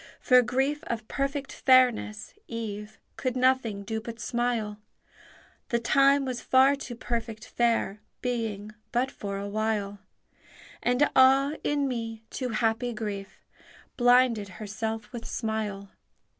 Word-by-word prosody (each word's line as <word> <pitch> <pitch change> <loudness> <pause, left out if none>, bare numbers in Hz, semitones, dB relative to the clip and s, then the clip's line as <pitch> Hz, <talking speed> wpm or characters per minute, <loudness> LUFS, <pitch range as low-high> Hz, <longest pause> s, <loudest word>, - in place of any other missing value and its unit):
For 250 -1 +6
grief 270 +5 0
of 225 -2 -4
perfect 275 +1 -2
fairness, 245 -5 +3
eve 215 -2 -6 0.2
Could 255 -1 -2
nothing 255 -5 +2
do 220 +2 -3
but 230 0 -8
smile; 235 -3 -1 0.9
The 235 - +2
time 275 +4 +4
was 255 -2 -3
far 265 +2 +5
too 260 -3 -7
perfect 230 -2 -4
fair, 230 -4 0 0.2
Being 220 -4 -3 0.2
but 250 +2 +1
for 200 -1 -5
a 200 +1 -4
while; 205 -1 -2 0.8
And 250 +4 +3
ah, 270 +2 +6
in 290 -1 +1
me, 225 -3 -4
too 255 -2 -3
happy 225 +1 0
grief 205 -3 -6 0.5
Blinded 245 -4 +4
herself 220 +1 -4
with 235 -1 -6
smile! 215 -4 -3
235 Hz, 125 wpm, -27 LUFS, 215-255 Hz, 0.9 s, For